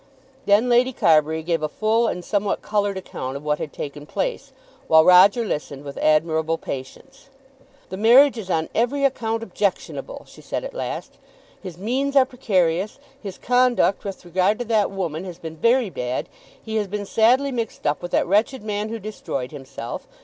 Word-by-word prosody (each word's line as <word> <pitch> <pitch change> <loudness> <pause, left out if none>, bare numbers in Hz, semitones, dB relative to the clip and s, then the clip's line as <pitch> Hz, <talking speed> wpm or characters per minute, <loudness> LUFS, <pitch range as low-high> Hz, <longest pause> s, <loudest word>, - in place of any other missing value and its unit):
Then 210 +4 +4
Lady 250 +2 +3
Carbury 160 -4 +3
gave 165 -1 -1
a 155 - -1
full 220 +6 +1
and 180 -4 -4
somewhat 205 -1 -1
coloured 205 -2 0
account 135 -7 -6
of 140 - -11
what 150 0 0
had 150 - -5
taken 145 0 -7
place, - - -3 0.4
while 160 0 +6
Roger 195 +6 +6
listened 145 -6 -4
with 140 -1 -8
admirable 160 +1 +2
patience. 265 - -9 0.6
"The 190 - -6
marriage 245 +7 +6
is 215 -5 -7
on 160 -3 0
every 270 +5 +1
account 230 -4 -1
objectionable," 205 - -3
she - - -15
said - - -4
at - - -7
last. - - -6 0.4
"His 185 -4 -8
means 260 +8 -1
are 270 -2 +6
precarious. 195 -7 0 0.2
His 195 -4 -7
conduct 250 -4 +2
with 195 -2 -7
regard 185 +4 +1
to 245 - -4
that 220 -2 +2
woman 175 -4 -4
has 180 -3 -8
been 160 -2 -8
very 230 +4 +2
bad. 125 -3 -3 0.3
He 220 -1 -4
has 210 -2 -1
been 205 +1 -4
sadly 250 +7 +3
mixed 230 -3 -4
up 145 0 0
with 175 - -5
that - - +1
wretched 210 +6 +1
man 210 0 -3
who 230 - -4
destroyed 190 - -5
himself. 130 -5 -8
200 Hz, 180 wpm, -22 LUFS, 160-235 Hz, 0.6 s, while